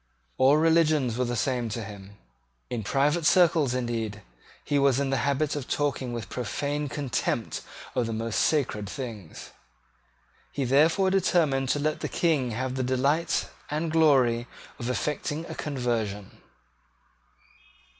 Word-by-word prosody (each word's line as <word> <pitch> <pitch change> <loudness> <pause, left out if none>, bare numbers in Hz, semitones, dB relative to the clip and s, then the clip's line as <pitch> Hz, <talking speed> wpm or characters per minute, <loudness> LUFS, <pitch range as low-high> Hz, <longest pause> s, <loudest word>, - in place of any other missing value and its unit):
All 135 +3 +6
religions 155 -6 +3
were 125 +1 0
the 120 0 -2
same 120 -1 -1
to 115 +1 -4
him. 100 -1 -11 0.5
In 120 -2 -2
private 145 +9 +1
circles, 160 -6 +4
indeed, 115 -4 -3 0.4
he 145 - +1
was 140 -2 +3
in 140 -1 0
the 135 - +2
habit 140 +2 0
of 145 -3 -4
talking 140 -4 -1
with 115 -3 -5
profane 145 +4 -3
contempt 120 -4 -2 0.3
of 125 -3 0
the - - -3
most 115 0 -2
sacred 115 -10 0
things. 110 - -7 1.0
He 140 - -2
therefore 160 +9 +3
determined 160 -8 +2
to 145 - +1
let 155 +1 -1
the - - -3
King 150 -7 +1
have 125 +3 -3
the 130 - -2
delight 135 +6 +1 0.2
and 155 +2 -2
glory 130 -7 +3 0.3
of 120 - -3
effecting 150 +4 -2
a 160 - -7
conversion. 115 -9 -3
135 Hz, 140 wpm, -27 LUFS, 120-150 Hz, 1.0 s, All